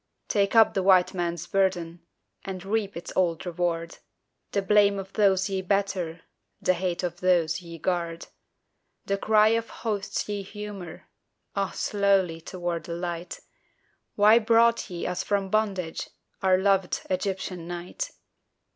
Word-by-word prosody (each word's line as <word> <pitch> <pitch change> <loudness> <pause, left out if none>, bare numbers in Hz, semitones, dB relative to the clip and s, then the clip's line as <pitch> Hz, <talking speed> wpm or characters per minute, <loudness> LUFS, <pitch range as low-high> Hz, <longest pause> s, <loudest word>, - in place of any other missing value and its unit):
Take 200 0 +1
up 225 -1 +7
the 195 - +1
White 185 -1 +5
Man's 175 -2 -2
burden 175 -3 0 0.4
And 190 -1 -6
reap 205 0 -1
his 170 - -7
old 175 -3 +1
reward; 170 -1 -2 0.5
The 200 - 0
blame 205 0 +4
of 195 0 -7
those 195 -2 +3
ye 195 -1 -2
better, 185 -4 -1 0.4
The 185 - +2
hate 180 0 -2
of 175 -1 -3
those 175 -2 +2
ye 170 -1 -9
guard 170 -1 -2 0.8
The 200 0 -1
cry 215 0 +5
of 230 0 0
hosts 205 -4 -3
ye 205 -1 -3
humour 200 -3 -8 0.5
(Ah, 195 -1 0
slowly!) 195 -5 +1
toward 175 -2 -4
the 170 - -4
light: 175 0 -5 0.7
"Why 215 +3 +6
brought 230 +1 +3
ye 175 -2 -5
us 180 0 -1
from 200 -2 -1
bondage, 195 -6 -1 0.3
Our 190 -1 +4
loved 195 -1 +1
Egyptian 185 -2 -2
night?" 175 - -5
190 Hz, 140 wpm, -26 LUFS, 175-200 Hz, 0.8 s, up